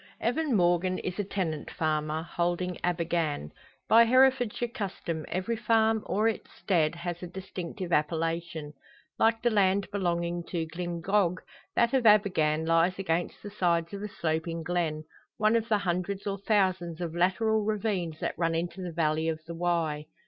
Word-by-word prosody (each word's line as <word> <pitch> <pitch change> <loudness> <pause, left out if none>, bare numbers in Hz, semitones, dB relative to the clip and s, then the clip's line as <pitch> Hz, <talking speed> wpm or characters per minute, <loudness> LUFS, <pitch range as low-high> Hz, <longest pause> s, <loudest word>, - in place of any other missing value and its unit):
Evan 270 +3 0
Morgan 175 0 +2
is 180 +2 -4
a - - +2
tenant 180 -6 -3
farmer, 155 0 -1
holding 175 +1 -1
Abergann. 165 - -1 0.4
By 230 +1 +7
Herefordshire 250 -1 +3
custom, 190 -8 -4
every 190 +6 -1
farm 225 -1 +2
or 215 +3 +2
its 225 - -3
stead, 165 -4 +1
has 175 0 -5
a 180 - -5
distinctive 185 0 -6
appellation. 165 0 -1 0.5
Like 225 0 +3
the 240 - +3
land 195 -1 +3
belonging 175 -3 -1
to 165 -2 -2
Glyngog, 175 +3 0 0.4
that 235 +1 +3
of 255 -4 +3
Abergann 160 -7 +4
lies 165 +2 +3
against 175 -3 -2
the 205 - -7
sides 170 -3 0
of 200 - -5
a 210 - -3
sloping 165 -2 -2
glen 160 -3 -1 0.3
one 215 +1 +3
of 230 -1 0
the 215 - +4
hundreds 190 +1 -2
or 200 -1 -2
thousands 185 -5 +1
of 170 -2 -3
lateral 210 +5 +2
ravines 200 -7 -1
that - - -1
run 165 -1 +1
into 170 +3 -3
the 180 -1 -4
valley 160 0 +1
of 160 -1 -2
the 170 - -6
Wye. 165 -3 -1
175 Hz, 160 wpm, -28 LUFS, 165-205 Hz, 0.5 s, By